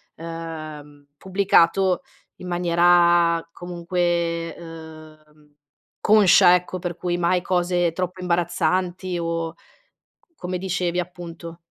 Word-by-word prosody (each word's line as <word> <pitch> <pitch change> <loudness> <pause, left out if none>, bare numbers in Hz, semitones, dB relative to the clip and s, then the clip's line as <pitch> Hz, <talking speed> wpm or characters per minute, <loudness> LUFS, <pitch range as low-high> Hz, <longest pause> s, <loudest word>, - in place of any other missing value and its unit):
ehm, 155 -3 -8
pubblicato 190 -1 +2 0.4
in 180 - -9
maniera, 175 -1 +3
comunque, 170 -1 -2
ehm, 155 -2 -13 0.5
conscia 195 -3 +6
ecco, 180 +1 -3
per 175 -1 -5
cui 175 -1 -2
mai 175 +1 +1
cose 175 -1 0
troppo 180 +1 -4
imbarazzanti 180 +1 -1
o 165 -1 -3 0.8
come 180 - -4
dicevi 180 -1 -2
appunto. 170 -1 -7
175 Hz, 90 wpm, -22 LUFS, 165-180 Hz, 0.8 s, conscia